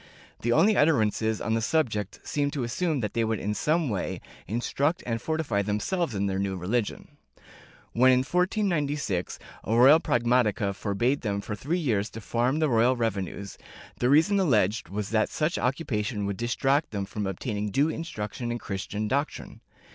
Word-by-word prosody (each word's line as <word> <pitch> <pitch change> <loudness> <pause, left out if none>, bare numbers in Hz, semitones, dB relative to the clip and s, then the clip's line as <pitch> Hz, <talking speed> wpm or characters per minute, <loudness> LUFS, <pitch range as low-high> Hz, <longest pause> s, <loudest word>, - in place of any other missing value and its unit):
The 120 - -1
only 195 - +4
utterances 110 - +2
on 110 - -1
the 115 - +1
subject 110 - -1
seem 145 -1 -1
to 130 - -1
assume 145 +4 -1
that 105 -3 -3
they 115 - +1
would 110 0 0
in 105 +1 -2
some 155 - +1
way 100 -7 -2 0.3
instruct 140 - -1
and 115 -2 -2
fortify 155 -10 -1
them 105 +1 -1
selves 170 - -1
in 100 0 0
their 95 -1 -1
new 95 -1 -2
religion. 105 +5 -3 0.8
When, 130 +2 +5
in 130 0 +4
1496, 150 - 0 0.3
a 110 - 0
royal 135 +7 +7
pragmatica 120 - +1
forbade 120 +8 0
them 100 -3 -1
for 105 - -5
three 145 - -2
years 110 - 0
to 110 - -8
farm 120 +6 0
the 155 -1 +2
royal 120 0 +3
revenues, 100 -4 -3 0.4
the 125 - +2
reason 160 +8 +4
alleged 110 - +2
was 105 +2 -4
that 110 -1 +2
such 155 +3 -1
occupation 120 -6 -1
would 100 -1 -3
distract 135 +5 +1
them 100 -2 -3
from 100 0 -4
obtain 105 +4 -4
ing 105 +1 -2
due 140 +9 +2
instruction 120 -7 -4
in 120 - -2
Christian 105 0 -4
doctrine. 140 +6 -3
120 Hz, 175 wpm, -27 LUFS, 105-145 Hz, 0.8 s, royal